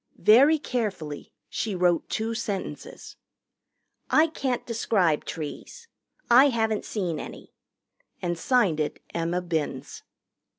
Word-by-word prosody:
Very 275 +9 +6
carefully 205 - -4 0.2
she 220 -3 -3
wrote 175 -2 +1
two 225 +1 -2
sentences. 210 -4 -6 0.9
"I 310 - +5
can't 270 -6 -2
describe 195 -9 +1
trees. 165 - -7 0.4
I 260 +4 +7
haven't 220 -3 0
seen 180 -7 -2
any." - - -10 0.7
And 175 -1 -2
signed 190 - +2
it 150 - -2
Emma 170 +2 -1
Binns. 155 -6 -3
210 Hz, 110 wpm, -26 LUFS, 170-240 Hz, 0.9 s, I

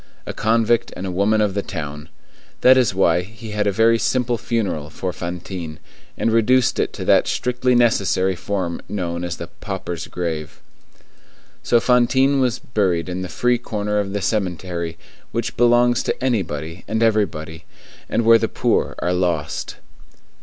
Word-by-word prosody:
A - - -5
convict 115 +1 +1
and 95 - -5
a 95 - -3
woman 100 +4 +2
of 105 -2 +1
the 100 - -1
town. 75 -4 -6 0.5
That 130 +1 +7
is 125 -7 +2
why 90 -2 +3
he 110 +4 -10
had 105 0 0
a - - +3
very 115 +3 +3
simple 125 -1 +1
funeral 105 -10 -2
for 90 +3 -4
Fantine, 85 -2 -6 0.4
and 115 - +1
reduced 120 +2 +3
it - - 0
to - - -6
that - - +4
strictly 125 0 0
necessary 100 -5 +2
form 90 -2 -3
known 85 -4 -3
as 85 -1 -4
the 85 - -5
pauper's 95 -1 -6
grave. 80 -4 -4 1.0
So 120 - +3
Fantine 130 +3 +3
was 125 -3 +1
buried 95 -7 -1
in 90 +1 -3
the 90 - -5
free 125 +8 +1
corner 105 -3 -2
of 100 -1 -2
the 100 0 -2
cemetery 90 -4 -2 0.3
which - - -3
belongs 120 0 +4
to - - -3
anybody 85 - -2
and 110 +1 0
everybody, 85 -8 0 0.4
and 115 - 0
where 115 0 +7
the - - 0
poor - - 0
are 90 - -1
lost. 85 -5 -1
100 Hz, 160 wpm, -21 LUFS, 85-115 Hz, 1.0 s, That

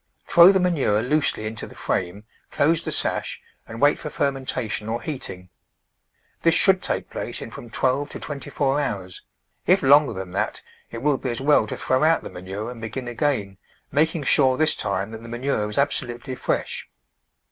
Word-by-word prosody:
Throw 170 +2 +8
the 190 - +2
manure 145 - +2
loosely 140 -4 +1
into 110 0 -5
the - - -14
frame, 95 +3 -2 0.3
close 165 +3 +2
the - - -3
sash - - -1 0.3
and 115 0 -8
wait 145 +2 +4
for 150 - -5
fermentation 130 -7 -2
or 115 +1 -1
heating. 95 - -6 0.9
This 165 -1 +4
should 190 -2 +4
take - - -3
place - - -4
in - - -8
from 120 - -10
twelve 135 +4 0
to - - -7
twenty 145 -2 -6
four 140 0 +1
hours; 95 -9 -4 0.5
if 185 -1 +4
longer 145 0 +6
than 95 -2 -6
that 105 +3 -2 0.3
it 115 +1 -7
will 145 -2 +3
be 130 - -3
as 120 - -2
well 140 -5 +3
to - - -5
throw 130 +2 +1
out 160 +1 +3
the - - -8
manure 95 +6 -6
and 120 -2 -10
begin 120 +3 -5
again, 120 -7 -1 0.3
making 155 +2 +1
sure 130 -2 +4
this 155 0 +3
time 100 +1 -2
that 110 0 -8
the 115 - -10
manure 120 -3 -1
is 105 - -6
absolutely 130 -2 -1
fresh. - - -2
130 Hz, 185 wpm, -23 LUFS, 110-145 Hz, 0.9 s, Throw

